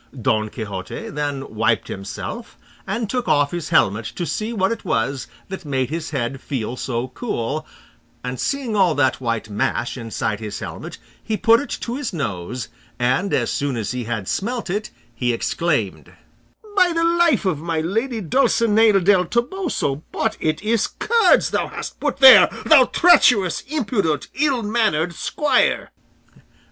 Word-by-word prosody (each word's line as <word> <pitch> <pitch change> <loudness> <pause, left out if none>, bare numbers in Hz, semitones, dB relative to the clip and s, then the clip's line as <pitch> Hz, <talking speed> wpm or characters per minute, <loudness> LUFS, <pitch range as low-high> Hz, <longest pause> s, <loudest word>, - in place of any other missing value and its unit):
Don 110 -2 0
Quixote 100 -5 -6
then 145 -3 -4
wiped 115 +1 +1
himself, 95 0 -7 0.3
and 230 -1 -2
took 250 +3 -2
off 145 -1 +2
his 175 -2 -4
helmet 105 +3 +2
to 175 - -3
see 215 +6 -3
what 195 -3 0
it 230 - -4
was 120 +4 -1 0.2
that 190 - -7
made 135 -3 -2
his 160 0 -4
head 135 -1 -3
feel 125 -3 -4
so 125 0 -3
cool, 150 - -4 0.6
and 125 0 -5
seeing 270 -6 -2
all 185 -6 +3
that 135 -2 +1
white 115 -3 -2
mash 110 +4 -2
inside 110 -3 -3
his 105 -2 -6
helmet - - -7 0.3
he 215 - -2
put 230 +2 +5
it 285 - -6
to 240 +2 -3
his 280 -8 -4
nose, 110 - -4 0.3
and 130 +11 0
as - - 0
soon 140 -3 -2
as 110 -3 -3
he 125 -2 -4
had 110 -4 -4
smelt 230 -2 -2
it 210 +3 -3 0.2
he 120 +1 0
exclaimed: 115 - -2 0.6
"By 365 -3 +4
the 330 0 +1
life 335 -7 +3
of 175 -6 0
my 165 0 -2
lady 225 +8 -2
Dulcinea 220 - +3
del 185 0 +4
Toboso, 235 - -2
but 220 -1 -1
it 155 +3 -1
is 220 0 +1
curds 455 -6 +2
thou - - 0
hast - - -7
put - - -1
here, 265 -2 +9 0.2
thou 285 -5 +7
treacherous, 245 - +4
impudent, 205 - -1
ill 275 -4 +1
mannered 205 -7 +1
squire!" 295 - 0
170 Hz, 155 wpm, -21 LUFS, -, 0.6 s, here